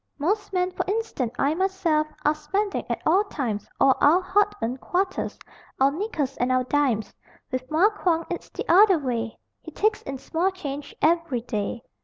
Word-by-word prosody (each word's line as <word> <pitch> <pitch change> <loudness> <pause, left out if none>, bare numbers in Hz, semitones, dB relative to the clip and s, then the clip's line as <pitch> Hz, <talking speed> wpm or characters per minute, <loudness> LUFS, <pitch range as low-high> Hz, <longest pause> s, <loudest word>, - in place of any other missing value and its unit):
Most 405 +8 -1
men 365 -1 0
(for 365 - -2
instance 400 - -1
I 285 +2 +2
myself) 345 -4 +1 0.2
Are 300 - +5
spending, 390 +7 -2
at - - -3
all 370 +6 +4
times, 230 - -3
All 270 - +5
our 310 +5 +6
hard 375 +2 +3
earned 240 +3 -3
quarters, 375 +1 -1 0.4
Our 270 +1 +5
nickels 310 - -3
and 245 +1 +1
our 255 0 +3
dimes: 250 -6 0 0.4
With 255 0 -3
Mar 350 +8 +4
Quong 335 -5 0
it's 350 - -5
the - - -6
other 380 +1 +6
way 235 -6 -3 0.2
He - - -9
takes 430 +1 0
in 270 0 -6
small 335 +7 0
change 290 -7 -6
every 320 -6 +2
day. 230 +1 -3
310 Hz, 175 wpm, -25 LUFS, 260-375 Hz, 0.4 s, our